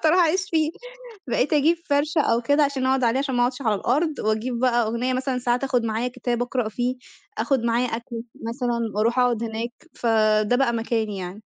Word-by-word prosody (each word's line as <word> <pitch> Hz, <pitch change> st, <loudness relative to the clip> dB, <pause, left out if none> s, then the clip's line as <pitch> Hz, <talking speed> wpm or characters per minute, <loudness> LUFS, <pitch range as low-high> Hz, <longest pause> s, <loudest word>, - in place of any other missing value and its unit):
بالضبط -, -, +1 dB
هاروح 330 Hz, +4 st, +5 dB
أعيش 350 Hz, +2 st, +3 dB
فيه، 315 Hz, -2 st, +2 dB, 0.6 s
بقيت 255 Hz, +4 st, +1 dB
أجيب 310 Hz, +4 st, +3 dB
فَرشة 295 Hz, +2 st, +2 dB
أو 235 Hz, -4 st, +1 dB
كده 285 Hz, +5 st, +3 dB
عشان 275 Hz, -2 st, -1 dB
أقعد 260 Hz, -1 st, +2 dB
عليه 235 Hz, +3 st, +2 dB
عشان 270 Hz, -2 st, -1 dB
ما 245 Hz, -, +2 dB
أقعدش 250 Hz, +2 st, 0 dB
على 220 Hz, -5 st, +1 dB
الأرض 295 Hz, -, 0 dB
وأجيب 220 Hz, +3 st, -1 dB
بقى 240 Hz, -1 st, +3 dB
أغنية 240 Hz, +3 st, -1 dB
مثلًا 255 Hz, 0 st, -1 dB
ساعات 245 Hz, +1 st, 0 dB
آخد 255 Hz, -3 st, +1 dB
معايا 225 Hz, +2 st, -1 dB
كتاب 245 Hz, -1 st, -2 dB
أقرأ 245 Hz, -2 st, -1 dB
فيه، 245 Hz, +3 st, -2 dB, 0.4 s
آخد 270 Hz, -5 st, +1 dB
معايا 235 Hz, +1 st, +1 dB
أكل 235 Hz, 0 st, -5 dB, 0.2 s
مثلًا 240 Hz, 0 st, -2 dB, 0.2 s
وأروح 230 Hz, +4 st, +1 dB
أقعد 240 Hz, -2 st, +2 dB
هناك، 230 Hz, +1 st, -3 dB, 0.2 s
فده 215 Hz, -1 st, +2 dB
بقى 245 Hz, -2 st, +2 dB
مكاني 225 Hz, -3 st, -1 dB
يعني. 180 Hz, 0 st, -6 dB
245 Hz, 200 wpm, -23 LUFS, 230-270 Hz, 0.6 s, هاروح